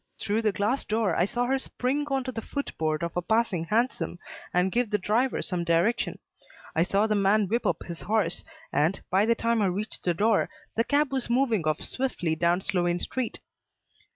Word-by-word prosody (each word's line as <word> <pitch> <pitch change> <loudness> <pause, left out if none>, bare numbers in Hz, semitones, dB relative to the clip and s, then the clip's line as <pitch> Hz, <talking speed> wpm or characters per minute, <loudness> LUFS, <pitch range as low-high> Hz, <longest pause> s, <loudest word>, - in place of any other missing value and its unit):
Through 210 +2 0
the 215 -2 +2
glass 210 +7 0
door, 220 -1 0
I 175 - +3
saw 245 +4 -1
her 265 +2 +1
spring 270 +3 -2
on 270 -1 0
to 255 - -4
the 225 - -5
foot 280 +5 -5
board 155 0 0
of 170 - -3
a 175 - +1
passing 220 -4 +1
hansom 225 -2 0 0.3
and 180 +1 +2
give 240 0 +1
the 210 - +2
driver 225 +7 +1
some 180 -2 -2
direction. 170 +8 +1 0.6
I 160 - +3
saw 195 +4 +2
the 220 - +1
man 205 0 +3
whip 230 +5 0
up 165 - 0
his 170 -1 -6
horse, 205 -5 0 0.3
and, 160 +6 +2
by 195 +4 +3
the 235 - +4
time 230 -1 +1
I 200 - +3
reached 205 +4 -3
the 175 -2 +1
door, 215 +3 +2 0.3
the 230 - +3
cab 285 +2 +2
was 260 -3 -1
moving 235 - +2
off 155 - 0
swiftly 215 -11 -2
towards 170 +3 +1
Sloane 175 -2 +1
Street. 250 +6 -3
210 Hz, 205 wpm, -27 LUFS, 175-235 Hz, 0.6 s, the